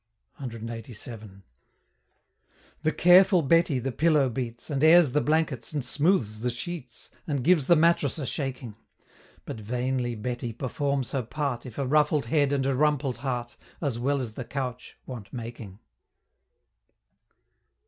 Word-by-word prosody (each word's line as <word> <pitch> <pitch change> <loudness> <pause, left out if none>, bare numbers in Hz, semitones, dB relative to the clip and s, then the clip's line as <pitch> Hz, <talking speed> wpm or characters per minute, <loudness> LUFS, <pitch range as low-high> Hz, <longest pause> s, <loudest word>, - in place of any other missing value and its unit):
CLXXXVII. 115 -4 -8 1.4
The 155 0 +1
careful 180 +1 +6
Betty 165 -1 +3
the 130 +2 -2
pillow 150 +1 +3
beats, 120 +2 -5
And 140 0 0
airs 160 -3 +7
the 150 +3 +2
blankets, 150 -5 0
and 145 -4 -2
smooths 135 - +1
the 125 +2 -1
sheets, 125 +1 -7 0.2
And 140 -5 -1
gives 160 -3 +3
the 175 - +6
mattress 165 -3 +3
a 145 - -3
shaking 130 -5 -4 0.7
But - - -6
vainly 125 +2 -2
Betty 120 +1 -4
performs 135 +1 -2
her 135 - 0
part, 125 0 -3
If 120 - -11
a 140 - -1
ruffled 150 +1 +2
head 145 -3 +2
and 140 -2 +1
a 135 -1 +1
rumpled 145 -3 +1
heart, 120 -2 -4 0.2
As 135 -7 -2
well 140 +3 +1
as 115 -4 -5
the 130 - -5
couch 125 -1 -5
want 120 -6 -8
making. 115 -5 -8
130 Hz, 140 wpm, -27 LUFS, 120-150 Hz, 1.4 s, airs